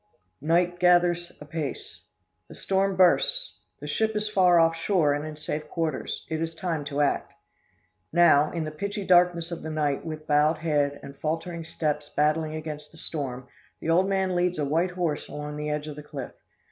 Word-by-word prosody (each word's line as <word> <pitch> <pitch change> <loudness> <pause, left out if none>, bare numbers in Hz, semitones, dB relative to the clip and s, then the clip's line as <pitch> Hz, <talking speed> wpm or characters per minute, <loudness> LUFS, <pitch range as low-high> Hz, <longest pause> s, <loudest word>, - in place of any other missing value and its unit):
Night 175 +3 +2
gathers 175 -1 +3
apace. 150 -1 -6 0.5
The - - -11
storm 195 0 +1
bursts 335 - +2 0.2
the - - -8
ship 220 0 0
is 210 0 0
far 180 -4 +4
off 165 0 +4
shore, 165 -3 +2
and 145 +1 -2
in 155 - -7
safe 150 0 -5
quarters. 160 -5 -3
It 160 0 -3
is 165 0 -3
time 165 -3 -2
to 145 0 -1
act. 140 -1 0 0.8
"Now, 155 -3 +5
in 165 - -2
the 155 - -4
pitchy 200 +5 -4
darkness 175 -2 +4
of 170 - -5
the 160 - -5
night, 150 -3 -1
with 155 -1 -6
bowed 150 +1 +3
head, 145 -3 0
and 140 - -9
faltering 165 +3 -3
steps 150 -2 -2
battling 155 +1 +1
against 150 -1 -6
the 165 - -16
storm, 130 -6 -5 0.3
the 165 - -1
old 185 +4 +3
man 190 -1 +1
leads 180 0 +1
a 150 - 0
white 165 +6 +1
horse 175 -4 -2
along 150 0 -6
the 150 0 -3
edge 150 0 -2
of 150 - -6
the 150 - -8
cliff. 145 -3 -7
160 Hz, 185 wpm, -26 LUFS, 150-175 Hz, 0.8 s, Now